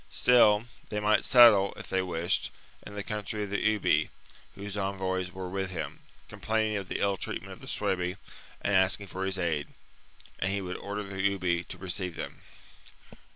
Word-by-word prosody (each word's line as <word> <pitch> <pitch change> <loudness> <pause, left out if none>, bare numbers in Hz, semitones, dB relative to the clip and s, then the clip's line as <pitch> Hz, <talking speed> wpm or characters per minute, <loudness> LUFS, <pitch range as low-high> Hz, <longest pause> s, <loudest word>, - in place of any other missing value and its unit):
Still, 105 - +5 0.3
they 105 - -2
might 105 +1 +3
settle, 115 -6 +7
if - - -9
they 95 - +1
wished, 85 0 0 0.3
in 105 - -10
the 100 - -3
country 105 0 -3
of 100 - -6
the 105 - -1
Ubii, 110 -1 +2 0.5
whose 100 0 -6
envoys 95 -2 -2
were 95 0 -6
with 95 +1 -3
him, 90 -3 -5 0.3
com - - -12
plaining 110 -1 +1
of 100 -2 -5
the - - -2
ill 100 -1 +1
treatment - - -5
of - - -13
the - - -12
Suebi 90 0 -1 0.5
and 100 - +1
asking 95 +2 +3
for 95 0 -4
his 95 0 -1
aid; 80 -5 -1 0.7
and 95 - 0
he 100 - 0
would 90 -1 -5
order 100 +1 -4
the 95 -1 -5 0.2
Ubii 85 -1 0
to - - -8
receive 90 -1 -2
them. - - -7
95 Hz, 185 wpm, -29 LUFS, 95-105 Hz, 0.7 s, settle